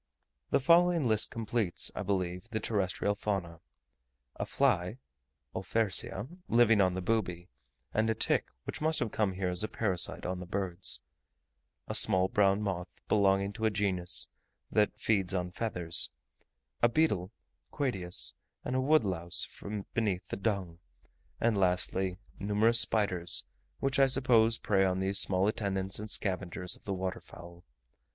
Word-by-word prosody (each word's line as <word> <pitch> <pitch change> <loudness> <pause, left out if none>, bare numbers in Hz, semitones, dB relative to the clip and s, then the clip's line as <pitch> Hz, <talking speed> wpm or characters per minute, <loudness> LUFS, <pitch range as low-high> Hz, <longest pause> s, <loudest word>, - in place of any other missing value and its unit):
The - - +2
following 170 +3 +4
list 110 -3 +3
completes, 110 -5 -1
I - - -5
believe, 90 0 -3
the 110 -2 -3
terrestrial 100 -1 -1
fauna: 95 -5 -4 0.8
a - - -4
fly 110 -6 +1 0.6
(Olfersia) 105 +2 0 0.2
living 115 -3 +4
on 90 -1 +2
the 95 - -4
booby, 90 -5 -2 0.4
and 110 +1 +1
a 110 - +1
tick - - +1 0.2
which - - -6
must 155 +1 +2
have 115 -3 -1
come 105 -3 0
here 95 0 -2
as 90 0 -1
a - - -1
parasite 95 -7 +1
on 90 0 -3
the 90 - -8
birds; 95 -1 +2 0.9
a - - -4
small 95 -3 +5
brown 100 0 +2
moth, 90 -3 -3 0.2
belonging 100 -1 +2
to 110 - -3
a - - +4
genus 95 -4 0 0.4
that 105 -1 +1
feeds 100 -4 0
on 90 -1 -2
feathers; 90 -5 0 0.7
a 120 - +5
beetle 110 - 0 0.4
(Quedius) 95 -11 -2 0.3
and 125 - -2
a 130 - +1
woodlouse 95 - +1
from 100 -1 -7
beneath 105 -4 -2
the - - -3
dung; 95 -5 -3 0.6
and 115 -1 +1
lastly, 90 0 +1 0.2
numerous 105 +3 +3
spiders, 90 -7 +2 0.4
which 135 0 0
I 135 - +6
suppose 120 -4 +3
prey 100 -2 +1
on 95 -1 0
these 95 +1 +1
small 95 +1 +1
attendants 100 -3 -2
and 105 +1 -7
scavengers 90 -3 0
of - - -21
the 100 - -2
water 95 0 -4
fowl. 85 0 -13
100 Hz, 150 wpm, -30 LUFS, 90-110 Hz, 0.9 s, I